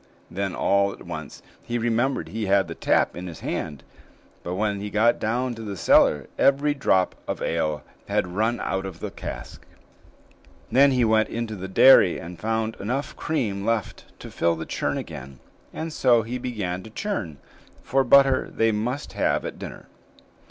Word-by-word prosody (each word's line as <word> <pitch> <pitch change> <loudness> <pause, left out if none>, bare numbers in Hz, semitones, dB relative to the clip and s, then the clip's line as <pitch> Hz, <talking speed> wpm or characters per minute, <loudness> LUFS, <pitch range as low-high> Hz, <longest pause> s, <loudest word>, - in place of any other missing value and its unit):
Then 95 0 -3
all 100 0 +2
at - - -13
once - - -8 0.2
he 120 - -3
remembered 120 +3 0
he 110 -1 -3
had 95 -1 +3
the 85 - -5
tap - - +1
in 90 +1 -6
his 85 -3 -9
hand; 75 -4 -4 0.6
but 90 - -4
when 100 0 -1
he 105 - -4
got 110 +3 +3
down 125 +3 -1
to 115 - -9
the 100 -3 -5
cellar, 75 -3 +4
every 140 +2 +3
drop 95 -10 +2
of - - -3
ale 75 -2 -1 0.2
had - - +1
run 110 +4 0
out 95 0 -2
of 95 - -9
the - - -5
cask. - - -8 1.1
Then 140 +2 +6
he 125 -3 +2
went 110 0 +3
into 115 -2 -4
the 95 -1 -6
dairy 95 -2 +6
and 85 +1 -9
found 110 +1 -1
enough 125 +8 -3
cream 105 -11 -2
left 115 -2 -2 0.2
to - - -9
fill 85 0 +1
the 80 - -6
churn - - -2
again, 65 +1 -8 0.3
and 160 0 -5
so 120 -5 +4
he 120 +3 -4
began 105 -8 -3
to 110 - -11
churn, 110 - -4 0.5
for 135 +1 +2
butter 135 +1 +5
they 115 0 +2
must 120 +6 -3
have - - 0
at - - -6
dinner. - - -8
110 Hz, 175 wpm, -24 LUFS, 95-125 Hz, 1.1 s, Then